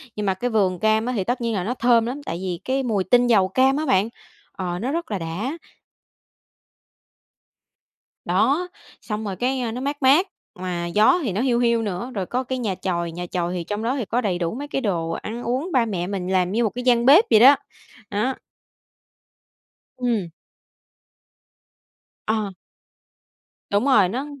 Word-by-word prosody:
nhưng 210 - -3
mà 190 - +2
cái 240 +7 -3
vườn 190 -6 +1
cam 220 +1 +2
á 250 - -1
thì 195 - 0
tất 245 +5 -2
nhiên 230 -1 -1
là 190 - -1
nó 225 +6 -2
thơm 240 -2 +3
lắm 265 +5 -5
tại 165 - -3
vì 180 -2 -3
cái 265 +1 0
mùi 210 -6 0
tinh 245 +5 +3
dầu 205 -6 +4
cam 265 +6 +2
á 310 - -1
bạn 210 -4 +2 0.4
ờ, 180 -2 -4
nó 250 +7 -2
rất 335 -4 -3
là 200 - -1
đã. 190 - -4 2.7
Đó, 260 - +2 0.3
xong 215 -1 -4
rồi 195 -2 -3
cái 255 +5 -1
á 235 -2 -2
nó 250 +3 -5
mát 285 +1 -3
mát, 295 +9 +5 0.3
mà 180 -2 -3
gió 210 - +4
thì 230 - -1
nó 200 - -1
hiu 245 -2 +2
hiu 235 -1 +2
nữa, 205 +4 -4
rồi 190 - -2
có 250 +7 -2
cái 260 +1 -3
nhà 210 -6 -2
chòi, 170 -2 -2
nhà 175 +2 -5
chòi 175 0 -2
hì 180 -2 -3
trong 205 +5 -4
đó 245 +4 0
thì 245 - -2
có 240 +5 0
đầy 190 -6 -1
đủ 170 +3 -2
mấy 285 +3 -5
cái 270 -2 -2
đồ 170 -7 -1
ăn 225 +8 -5
uống, 260 +9 -2
ba 255 -6 +3
mẹ 180 -5 -3
mình 190 -2 -3
làm 185 -1 +1
như 230 +4 +1
một 220 - +2
cái 250 - -4
gian 240 -1 +3
bếp 300 - +8
vậy 220 - +6
đó, 265 +5 +9 0.5
á. 225 +6 -1 1.6
Ừm. 230 -8 -1 2.0
Ờ. 215 -3 -1 1.2
Đúng 205 +4 +1
rồi, 230 -10 +5
nó 255 +7 -3
220 Hz, 190 wpm, -23 LUFS, 185-255 Hz, 2.7 s, đó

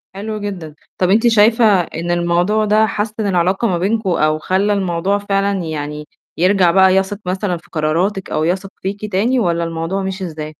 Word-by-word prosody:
حلو 215 +2 -5
جدًا. 180 -7 -6 0.2
طَب 180 - +1
أنتِ 225 +5 +4
شايفة 225 +1 +4 0.2
إن 170 0 -5
الموضوع 175 +5 +1
ده 215 +1 +3
حسِّن 215 +1 -3
العلاقة 185 +4 +1
ما 180 -4 0
بينكم 200 +3 -1
أو 155 -2 +1
خلّى 195 +5 0
الموضوع 190 0 0
فعلًا 200 -1 -1
يعني 150 -1 -5 0.3
يرجع 185 0 +3
بقى 190 0 +5
يثق 195 +1 0
مثلًا 185 0 -2
في 165 - -19
قراراتِك 175 +6 -1
أو 155 - -1
يثق 185 +4 -1
فيكِ 205 +2 -5
تاني 230 +7 +1
والّا 170 -5 0
الموضوع 165 +4 -3
مِشِي 190 0 -4
إزاي؟ 155 -2 -7
190 Hz, 175 wpm, -17 LUFS, 170-205 Hz, 0.3 s, بقى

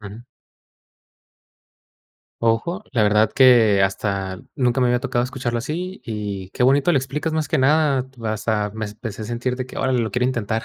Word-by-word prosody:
Ujú. 105 +3 -10 2.2
Ajá, 115 - 0
la 115 -4 +2
verdad 105 +1 +3
que 120 -6 +5
hasta 95 -1 -1 0.2
nunca 125 0 +1
me 125 - +3
había 125 0 +2
tocado 125 -2 0
escucharlo 125 -2 -3
así. 175 +9 -5
Y 105 -4 -5
qué 125 - -2
bonito 140 +6 +4
lo 140 - +4
explicas 150 +5 -3
más 155 -2 -1
que 160 - +1
nada, 140 -1 +2
pues, 110 -4 -5
a 105 -2 0
mes 110 -1 -5
empecé 110 -1 -7
a - - -4
sentir 120 +2 -3
de 130 - -3
que, 130 - -9
órale, 130 -2 +1
lo 110 -2 -2
quiero 125 0 0
intentar, 115 -3 -2
120 Hz, 180 wpm, -21 LUFS, 110-135 Hz, 2.2 s, que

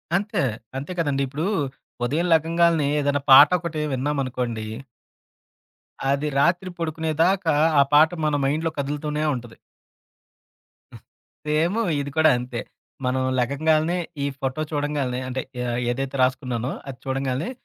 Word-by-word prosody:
అంతే. 205 +3 0 0.4
అంతే 140 +6 -5
కదండీ. 145 -4 +1
ఇప్పుడు 145 +5 -3 0.6
ఉదయం 155 +8 0
లెగంగాాల్నే 165 -1 +3
ఏదైనా 145 0 0
పాటొకటి 170 +2 +6
విన్నామనుకోండి. 130 -4 -2 1.5
అది 140 +2 0
రాత్రి 175 +5 +2
పొడుకునేదాకా 165 +2 +1 0.3
ఆ - - +7
పాట 155 +2 +7 0.2
మన 150 -1 +1
మైండ్‌లో 155 +4 0
కదులుతూనే 150 +2 -2
ఉంటది. 120 -2 -9 1.4
హ్మ్. - - -12 0.5
సేమూ 165 +9 +1 0.2
ఇది 140 0 -4
కూడా 160 0 +6
అంతే. 125 -1 -5 0.5
మనం 130 +1 0 0.2
లెగంగాల్నే 155 +6 +1 0.3
ఈ - - +1
ఫోటో 135 +2 -2
చూడంగాల్నే 145 -4 -1
అంటే, 130 +1 -3 0.2
ఆహ్, 120 -1 -2
ఏదైతే 135 +2 -3
రాసుకున్నానో 125 -1 -1 0.2
అది 130 -2 -7
చూడంగాల్నే 135 - -2
145 Hz, 115 wpm, -23 LUFS, 130-160 Hz, 1.5 s, ఆ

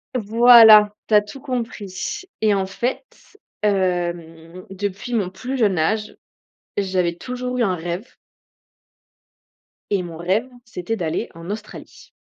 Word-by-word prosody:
Voilà, 220 -2 +7
tu - - -3
as 210 - +7
tout 210 +6 -11
compris, 230 - -5 0.2
et 215 -1 +3
en 195 -1 0
fait, 240 - -3 0.6
hem, 175 -3 -2
depuis 200 +4 -5
mon 205 -6 0
plus 250 +8 -5
jeune 205 -7 +2
âge, 210 +7 -1 0.6
j'avais 185 -3 0
toujours 250 +4 -5
eu 245 - +2
un 190 -4 +1
rêve 175 +7 -5 1.8
et 195 -3 0
mon 170 -2 -8
rêve, 190 +9 -1 0.2
c'était 225 -1 -4
d'aller 165 -5 -3
en 165 +2 -10
Australie. 215 +1 -9
200 Hz, 130 wpm, -21 LUFS, 180-225 Hz, 1.8 s, Voilà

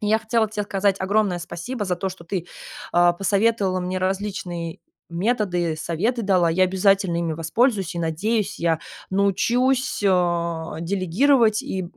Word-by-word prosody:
И 210 - -3
я 215 +1 +3
хотела 220 0 0
тебе 210 -1 -3
сказать 200 -1 +1
огромное 195 -1 +1
спасибо 175 +7 -5
за 180 -2 -1
то, 190 +2 -2
что 185 -2 -10
ты, 175 0 -4 0.5
а, 175 0 +5
посоветовала 195 0 +1
мне 185 +1 -2
различные 185 -3 -3 0.3
методы, 180 -4 0
советы 215 +10 -1
дала. 185 -4 +3
Я 185 +3 +3
обязательно 190 -1 +2
ими 170 -1 -1
воспользуюсь. 190 - 0
И, 170 - -3
надеюсь, 190 +5 -1
я 165 -1 +1 0.3
научусь, 235 +8 +1
а, 170 -3 0
делегировать 210 - +2
и, 190 - -3
190 Hz, 145 wpm, -23 LUFS, 175-210 Hz, 0.5 s, а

